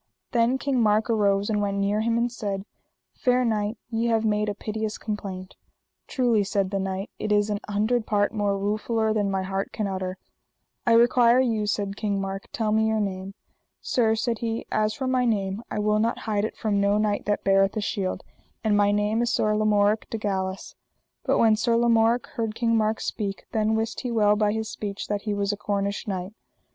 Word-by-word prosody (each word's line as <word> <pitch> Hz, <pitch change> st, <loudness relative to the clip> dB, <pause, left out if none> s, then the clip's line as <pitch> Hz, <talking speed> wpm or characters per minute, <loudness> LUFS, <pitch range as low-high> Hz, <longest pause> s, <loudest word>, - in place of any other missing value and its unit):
Then 240 Hz, +2 st, +2 dB
King 265 Hz, -2 st, 0 dB
Mark 215 Hz, +1 st, +2 dB
arose 200 Hz, -2 st, +2 dB
and 210 Hz, -2 st, 0 dB
went 200 Hz, -1 st, -1 dB
near 200 Hz, +2 st, +1 dB
him 230 Hz, +1 st, +1 dB
and 235 Hz, +1 st, 0 dB
said: 200 Hz, -4 st, -4 dB, 0.5 s
Fair 250 Hz, 0 st, +2 dB
knight, 215 Hz, -1 st, -1 dB
ye 230 Hz, +1 st, 0 dB
have 225 Hz, -1 st, +1 dB
made 210 Hz, 0 st, +1 dB
a 205 Hz, -, -3 dB
piteous 215 Hz, 0 st, -4 dB
complaint. 195 Hz, -3 st, -5 dB, 0.5 s
Truly, 240 Hz, -5 st, +2 dB
said 195 Hz, -1 st, -1 dB
the 195 Hz, -, -1 dB
knight, 190 Hz, +1 st, -3 dB
it 215 Hz, -, -2 dB
is 205 Hz, 0 st, +2 dB
an 205 Hz, -, -1 dB
hundred 215 Hz, +3 st, 0 dB
part 205 Hz, 0 st, +1 dB
more 205 Hz, -2 st, 0 dB
ruefuller 215 Hz, +2 st, 0 dB
than 205 Hz, -2 st, 0 dB
my 190 Hz, -1 st, -1 dB
heart 195 Hz, +1 st, -3 dB
can 215 Hz, -, -2 dB
utter. 185 Hz, -1 st, -3 dB, 0.7 s
I 230 Hz, -, +5 dB
require 240 Hz, +1 st, +5 dB
you, 225 Hz, -5 st, +1 dB
said 200 Hz, -1 st, -2 dB
King 205 Hz, -2 st, -1 dB
Mark, 195 Hz, 0 st, -4 dB
tell 220 Hz, -2 st, -1 dB
me 220 Hz, +1 st, +3 dB
your 220 Hz, 0 st, +1 dB
name. 195 Hz, -1 st, -3 dB, 0.4 s
Sir, 225 Hz, -3 st, +1 dB
said 230 Hz, 0 st, -1 dB
he, 230 Hz, -1 st, -3 dB
as 215 Hz, 0 st, +1 dB
for 265 Hz, -, -4 dB
my 255 Hz, -1 st, +2 dB
name 200 Hz, -3 st, 0 dB
I -, -, -4 dB
will 210 Hz, 0 st, +2 dB
not 230 Hz, +2 st, +1 dB
hide 210 Hz, -2 st, 0 dB
it -, -, -6 dB
from 205 Hz, -3 st, 0 dB
no 200 Hz, +1 st, +3 dB
knight 210 Hz, -1 st, 0 dB
that 205 Hz, 0 st, 0 dB
beareth 195 Hz, +2 st, +3 dB
a -, -, +2 dB
shield, 195 Hz, -2 st, -2 dB, 0.4 s
and 215 Hz, -2 st, +2 dB
my 205 Hz, 0 st, +4 dB
name 210 Hz, +2 st, +1 dB
is 240 Hz, -, +1 dB
Sir 215 Hz, 0 st, +1 dB
Lamorak 210 Hz, 0 st, +2 dB
de 225 Hz, -, -3 dB
Galis. 190 Hz, -2 st, -3 dB, 0.5 s
But -, -, +2 dB
when 220 Hz, -1 st, +5 dB
Sir 230 Hz, +1 st, +1 dB
Lamorak 235 Hz, 0 st, +3 dB
heard 225 Hz, -2 st, -4 dB
King 230 Hz, -1 st, +1 dB
Mark 220 Hz, 0 st, +1 dB
speak, 200 Hz, -2 st, -4 dB
then 220 Hz, 0 st, +1 dB
wist 225 Hz, 0 st, -2 dB
he 250 Hz, -, -3 dB
well 210 Hz, -3 st, +3 dB
by 210 Hz, -1 st, +2 dB
his 220 Hz, 0 st, -2 dB
speech 205 Hz, -1 st, -5 dB
that 205 Hz, -1 st, -1 dB
he 205 Hz, -, 0 dB
was 200 Hz, 0 st, 0 dB
a -, -, -5 dB
Cornish 200 Hz, 0 st, -2 dB
knight. 190 Hz, 0 st, -4 dB
210 Hz, 205 wpm, -25 LUFS, 200-225 Hz, 0.7 s, I